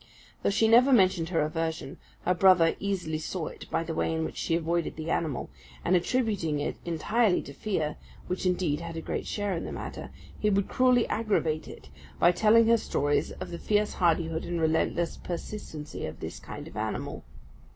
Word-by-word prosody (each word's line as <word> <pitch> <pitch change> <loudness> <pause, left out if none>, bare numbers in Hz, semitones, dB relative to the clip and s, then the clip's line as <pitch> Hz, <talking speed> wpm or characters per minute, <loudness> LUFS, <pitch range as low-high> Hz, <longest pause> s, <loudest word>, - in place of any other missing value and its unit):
Though - - +2
she 210 +3 +3
never 245 +4 +6
mentioned 185 -8 +4
her 170 -3 +1
aversion, 160 -2 -3 0.3
her 180 - +3
brother 180 -2 +5
easily 180 -6 -2
saw 165 +1 -3
it - - -11
by 165 - 0
the 165 0 -4
way 160 - 0
in 160 0 -1
which - - -6
she 165 - 0
avoided 170 0 -1
the 160 +1 -4
animal; 150 - -1 0.3
and 185 - +4
attributing 185 - 0
it 145 - -2
entirely 180 +5 +1
to 140 - -9
fear 155 -3 -2 0.3
which 180 - -3
indeed 175 -5 +1
had 170 -1 -6
a - - -3
great - - -4
share 205 -2 -1
in 165 - -3
the - - -5
matter - - -6 0.3
he 210 - +2
would 200 -1 +2
cruelly 250 -2 +3
aggravate 180 -8 0
it, - - -11 0.3
by 175 - +5
telling 220 +5 +5
her 230 +1 +5
stories 145 -7 0
of - - -7
the 170 - -5
fierce 210 0 +1
hardihood 165 -2 +1
and 175 -1 -3
relentless 160 +1 +1
persistency 170 -4 -6
of - - -8
this - - -6
kind - - -8
of - - -12
animal. - - -3
170 Hz, 190 wpm, -28 LUFS, 160-205 Hz, 0.3 s, never